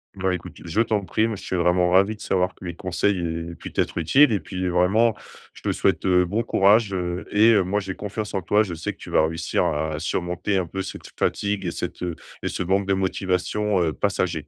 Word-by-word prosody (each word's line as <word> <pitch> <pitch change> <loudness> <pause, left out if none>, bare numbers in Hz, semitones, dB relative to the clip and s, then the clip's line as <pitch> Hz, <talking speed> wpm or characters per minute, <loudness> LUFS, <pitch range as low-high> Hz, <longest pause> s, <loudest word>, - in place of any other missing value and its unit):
Bah, 95 -1 0
écoute, 90 -2 -6
je 85 +7 +1
t'en 110 -3 0
prie. 110 +3 +1
Moi, 110 - -3
je 95 - -10
suis - - -3
vraiment 90 0 +2
ravi 100 +4 +4
de 105 - -17
savoir 90 0 0
que - - -15
mes 85 - -4
conseils 95 +3 0
aient 85 0 -4
pu - - -9
t'être - - -1
utiles 135 - +5
et 105 - +1
puis, 95 -1 -4
vraiment, 95 +6 +3 0.4
je - - -15
te - - 0
souhaite, 95 -5 0
heu, 90 -1 +4
bon 100 +6 -1
courage, 105 0 +3
heu, 90 -1 -3
et 110 +3 +6
heu, 100 -3 +4
moi, 95 +3 0
j'ai 95 -2 -5
confiance 105 +1 -5
en 95 - -1
toi. 105 +4 +3
Je 95 -5 -5
sais 80 - -4
que - - -27
tu - - -11
vas 80 - +4
réussir 80 0 -1
à 75 +1 -1
surmonter 90 +4 -1
un 95 - 0
peu 95 +3 -4
cette 95 - -8
fatigue 100 -1 0
et 85 - -1
cette, - - -5
heu 90 -2 -3 0.3
et - - -2
ce - - -2
manque 95 +2 +1
de 100 - +2
motivation, 95 +1 0
heu, 80 -2 0
passager. 90 -6 -1
95 Hz, 240 wpm, -23 LUFS, 90-100 Hz, 0.4 s, et